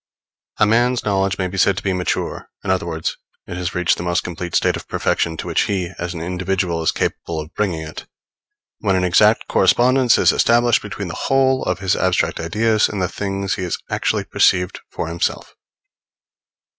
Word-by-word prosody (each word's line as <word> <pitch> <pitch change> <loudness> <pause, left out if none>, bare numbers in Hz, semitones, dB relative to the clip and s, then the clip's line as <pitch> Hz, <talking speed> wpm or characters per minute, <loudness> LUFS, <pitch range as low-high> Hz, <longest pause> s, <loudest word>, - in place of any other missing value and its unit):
A - - +4
man's 120 +3 +2
knowledge 95 -2 +1
may 95 - -1
be 95 +1 -5
said 95 +1 +3
to - - -4
be 95 - 0
mature, 90 -1 -3
in - - -1
other 90 -2 0
words, 80 -1 -3 0.3
it 90 - -7
has 90 -1 -4
reached 90 -2 +2
the - - -5
most 85 +2 0
complete 90 0 -5
state - - +2
of - - -8
perfection 80 -1 -1
to - - -5
which - - +1
he, 95 -3 -2
as 85 0 -4
an 80 - -5
individual, 90 -1 -1
is 80 - +2
capable 80 -2 -3
of 80 +1 -8
bringing 90 -7 -1
it, 75 - -9 0.7
when 100 -3 +1
an 90 - +1
exact 90 -1 +4
correspondence 125 0 +4
is - - +5
established 120 0 +3
between 105 -2 -6
the - - -5
whole 130 +3 +1
of 90 - 0
his 95 0 0
abstract 95 -1 0
ideas 110 +6 +1
and 105 - -4
the 90 - +1
things 100 0 -3
he - - -4
has 90 - -2
actually - - 0
perceived 90 +1 +2
for - - -4
himself. 85 +1 -3
95 Hz, 195 wpm, -20 LUFS, 85-105 Hz, 0.7 s, is